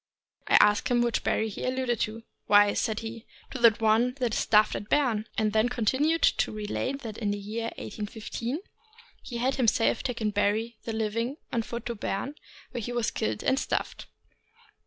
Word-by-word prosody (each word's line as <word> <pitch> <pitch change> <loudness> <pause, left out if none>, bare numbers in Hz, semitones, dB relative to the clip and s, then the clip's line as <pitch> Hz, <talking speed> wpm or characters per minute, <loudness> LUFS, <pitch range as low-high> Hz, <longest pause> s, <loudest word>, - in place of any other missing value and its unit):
). - - -67
I - - +4
asked 210 0 +4
him 245 -1 +3
which 235 -1 0
Barry 220 - +1
he 205 - -6
alluded 255 -2 0
to. 225 +2 -2
" - - -52
Why," 205 0 +6
said 220 -1 -1
he, 225 0 -7
" - - -27
to 260 - -5
the 235 -1 +8
one 225 +3 +2
that 245 -5 -1
is - - +1
stuffed 215 0 +4
at 205 - -6
Berne; 235 -7 +2
" - - -26
and 215 -1 +1
then 220 +1 +4
he - - 0
continued 265 +8 +1
to - - +3
relate 215 +6 -3
that 220 -3 -6
in 210 -3 -1
the 205 - -1
year 215 +3 -4
1815 230 - -5 0.6
he 240 - -6
had 260 +3 0
him 250 -3 +2
self 225 - +2
taken 230 -4 -2
Barry, 215 +3 0
then 225 -1 -3
living, 230 +5 -1 0.2
on 235 - +2
foot 235 +1 -6
to 235 - -2
Berne, 230 +5 -3 0.4
where 240 - -4
he 240 - -4
was 240 -2 0
killed 105 0 -2
and 265 +1 +2
stuffed. - - -3
230 Hz, 210 wpm, -28 LUFS, 215-245 Hz, 0.6 s, the